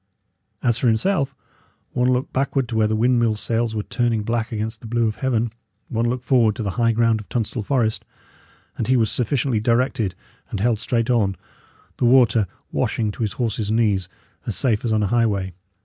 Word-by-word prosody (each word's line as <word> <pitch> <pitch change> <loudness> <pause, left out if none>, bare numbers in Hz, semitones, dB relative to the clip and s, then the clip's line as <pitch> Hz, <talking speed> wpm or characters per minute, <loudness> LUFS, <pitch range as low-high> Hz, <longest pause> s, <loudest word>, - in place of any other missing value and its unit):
As 120 -1 +2
for 130 - +1
himself, 140 - +1 0.6
one 125 +1 +2
look 125 +1 -1
backward 135 -1 0
to 115 - -3
where 110 -1 +3
the 110 - 0
windmill 120 -1 +2
sails 115 +1 -1
were 105 - -1
turning 115 -2 0
black 115 +1 -1
against 110 +1 -4
the 115 - -9
blue 115 0 +1
of 110 - -3
heaven 120 -4 0 0.4
one 115 +1 0
look 125 +1 -3
forward 115 -5 +3
to 115 - -4
the 100 - -1
high 115 +3 +2
ground 115 -1 +2
of 105 - -12
Tunstall 115 0 -2
Forest, 110 -1 0 0.8
and 110 - -1
he 130 - +4
was 110 -3 +2
sufficiently 125 -1 0
directed 115 -4 +1 0.3
and 105 - -4
held 110 +1 +1
straight 115 +1 0
on, 100 -5 +2 0.6
the - - +1
water 120 -4 +5 0.2
washing 110 -2 0
to 105 - -9
his 105 -3 -1
horse's 110 -3 -2
knees, 105 -5 +1 0.4
as - - -2
safe 115 -6 +1
as 120 - -1
on 110 -1 +2
a - - +1
highway. 100 -6 +1
115 Hz, 195 wpm, -22 LUFS, 110-120 Hz, 0.8 s, water